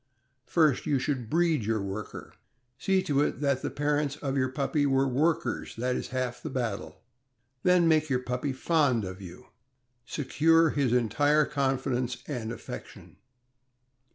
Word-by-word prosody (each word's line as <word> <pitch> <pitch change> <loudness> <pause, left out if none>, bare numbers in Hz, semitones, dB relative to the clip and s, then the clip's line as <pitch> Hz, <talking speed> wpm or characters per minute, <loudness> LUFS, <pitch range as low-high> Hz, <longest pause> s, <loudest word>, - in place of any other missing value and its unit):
First, 155 -6 +2
you 145 - +2
should 130 -4 -2
breed 165 -5 +2
your 110 +1 0
worker. 100 +2 -6 0.5
See 190 +2 +2
to 145 -1 +1
it 145 - 0
that 140 -2 +1
the - - -2
parents 145 -1 0
of 135 -2 -3
your 130 -1 +1
puppy 145 +2 0
were 135 0 +2
workers 135 -1 0
— - - -25
that 125 +2 0
is - - -3
half 130 -2 -3
the - - -5
battle; 120 -6 -4 0.6
then 180 -2 +4
make 155 -1 +3
your 130 - +2
puppy 125 +3 -2
fond 130 - +1
of 95 +1 -7
you 90 -1 -11 0.3
— 130 - -48 0.2
secure 160 +3 +3
his 140 -4 +1
entire 145 +6 +3
confidence 130 -3 -1
and 120 -6 -4
affection. 120 - -9
135 Hz, 155 wpm, -28 LUFS, 125-150 Hz, 0.6 s, then